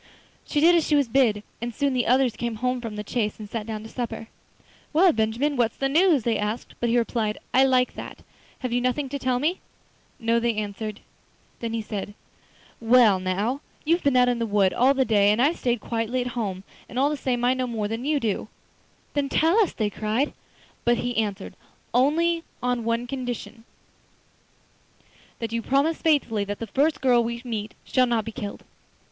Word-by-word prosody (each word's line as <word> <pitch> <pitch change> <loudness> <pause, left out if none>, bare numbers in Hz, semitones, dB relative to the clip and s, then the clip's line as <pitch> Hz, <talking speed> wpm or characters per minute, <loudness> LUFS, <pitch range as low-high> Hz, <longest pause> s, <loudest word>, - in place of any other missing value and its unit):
She 295 - 0
did 335 +4 +6
as 335 -2 +3
she 300 - +3
was 285 -3 +3
bid, 225 -4 +2 0.2
and 235 0 -4
soon 280 -2 +1
the 250 -1 0
others 255 -1 +3
came 235 -1 -3
home 250 +2 -1
from 225 -3 -6
the 210 - -4
chase 210 0 -2
and 215 - -8
sat 215 0 -5
down 215 -1 -5
to - - -8
supper. 235 -2 -5 0.6
'Well, 350 +4 +6
Benjamin, 230 +6 0
what's 230 -2 +1
the 270 - 0
news?' 320 - +4
they 230 0 0
asked. 210 +3 -3
But 240 - 0
he 235 - +3
replied, 225 -2 0 0.2
'I 265 +1 +6
like 255 -1 +2
that; - - -9 0.4
have 255 -2 -2
you 245 - +1
nothing 255 +3 -1
to 280 +1 -4
tell 255 -1 +1
me?' 315 +8 0 0.6
'No,' 230 0 +2
they 235 -1 0
answered. 210 0 -4 0.6
Then 230 -1 -4
he 225 -1 -2
said: 205 -1 -5 0.6
'Well, 230 -4 +5
now, 200 +9 -1 0.2
you've 335 +3 +2
been 280 -3 +2
out 250 0 +5
in 245 -1 +1
the 230 - -1
wood 200 -3 +2
all 265 +3 +4
the 265 -1 +2
day 205 -3 +4
and 210 - +1
I've 290 +7 +2
stayed 240 -3 0
quietly 230 +2 -1
at 245 - -3
home, 195 -6 -3 0.3
and 245 - -8
all 280 +3 +3
the - - -1
same 245 -3 -1
I 250 - +4
know 255 -1 -2
more 220 -3 -2
than 225 +3 -4
you 295 +1 +1
do.' 215 -4 -2 0.7
'Then 285 -1 0
tell 325 +6 +3
us,' 420 - +2
they 210 -2 -1
cried. 220 +8 -1 0.5
But 240 0 +3
he 245 +1 -2
answered: 205 -3 -2 0.4
'Only 330 +7 +2 0.2
on 235 -1 0
condition 245 -3 -6 1.7
that 230 -1 -5
you 230 - 0
promise 280 +7 +1
faithfully 270 -10 +2
that 205 0 -4
the 230 - -5
first 285 +8 +1
girl 245 -3 +4
we 235 +1 -3
meet 220 -3 -4
shall 255 -1 +2
not 230 -3 0
be 225 - -5
killed. 205 -2 -6
240 Hz, 200 wpm, -25 LUFS, 220-270 Hz, 1.7 s, did